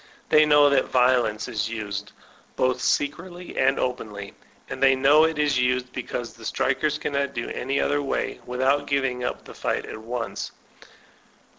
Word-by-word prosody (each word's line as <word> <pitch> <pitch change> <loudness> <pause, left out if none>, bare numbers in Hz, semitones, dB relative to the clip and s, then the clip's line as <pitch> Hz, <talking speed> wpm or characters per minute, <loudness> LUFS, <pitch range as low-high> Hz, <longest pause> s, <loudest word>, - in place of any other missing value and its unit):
They 155 0 +6
know 145 -1 +6
that 135 -2 +3
violence 125 -4 +2
is 115 -2 -2
used, 105 -3 -5 0.4
both 130 0 +1
secretly 175 +5 -2
and 135 +1 +2
open 125 -3 -2
ly; 100 -1 -8 0.4
and - - -7
they 135 -1 +6
know 145 +4 +5
it 160 -1 -1
is 145 -3 +2
used 125 0 0
because 120 -1 -5
the 115 - -15
strikers 145 +6 0
cannot 140 -2 -2
do 120 - -3
any 135 +2 -2
other 145 0 +1
way, 140 - -2
without 135 +3 +1
giving 135 -3 0
up - - -4
the - - -11
fight - - -2
at - - -8
once. 115 +1 -5
130 Hz, 165 wpm, -24 LUFS, 125-145 Hz, 0.4 s, They